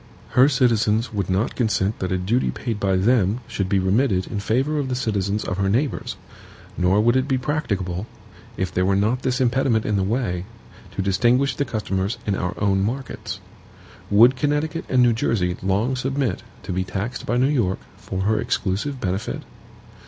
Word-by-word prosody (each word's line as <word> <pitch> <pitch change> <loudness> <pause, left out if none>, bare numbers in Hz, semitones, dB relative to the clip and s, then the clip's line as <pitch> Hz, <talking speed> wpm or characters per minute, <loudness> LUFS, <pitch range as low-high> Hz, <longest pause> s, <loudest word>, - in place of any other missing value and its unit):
Her 130 +3 +5
citizens 115 -4 +2
would 100 -3 -2
not 95 +6 0
consent 110 -3 0
that 95 -1 -2
a 95 - +1
duty 105 +8 +1
paid 115 -4 -3
by 95 -2 +1
them 105 +2 +2
should 100 -2 -2
be 100 - +2
remitted 95 0 +2
in 105 - -4
favor 130 +9 0
of 135 -2 -2
the 125 - -1
citizens 105 -4 -1
of 90 - -3
her 100 0 +1
neighbors; 125 +6 -1 0.6
nor 90 +3 +2
would 120 +3 +4
it 130 +1 +2
be 135 -2 +1
practicable, 105 - -2 0.5
if 95 -1 -2
there 90 - +1
were 95 +1 +2
not 110 +6 +1
this 130 0 0
impediment 125 -3 +2
in 105 - +1
the 95 - +1
way, 95 -4 -1 0.5
to - - -1
distinguish 120 +8 +2
the 145 - 0
customers 105 -3 -2
in 105 - 0
our 90 -2 -2
own 100 -2 +2
markets. 120 +6 -4 0.7
Would 115 +6 +6
Connecticut 150 +4 -1
and 125 -1 +4
New 120 -1 +4
Jersey 90 -5 0
long 100 +7 +1
submit 130 -4 -1 0.2
to - - -4
be 95 +1 0
taxed 100 +6 -4
by 120 - +1
New 125 - +4
York 120 -10 +1 0.2
for 95 0 -5
her 110 +3 +1
exclusive 110 +8 -1
benefit? 95 -1 -3
110 Hz, 180 wpm, -23 LUFS, 95-125 Hz, 0.7 s, Would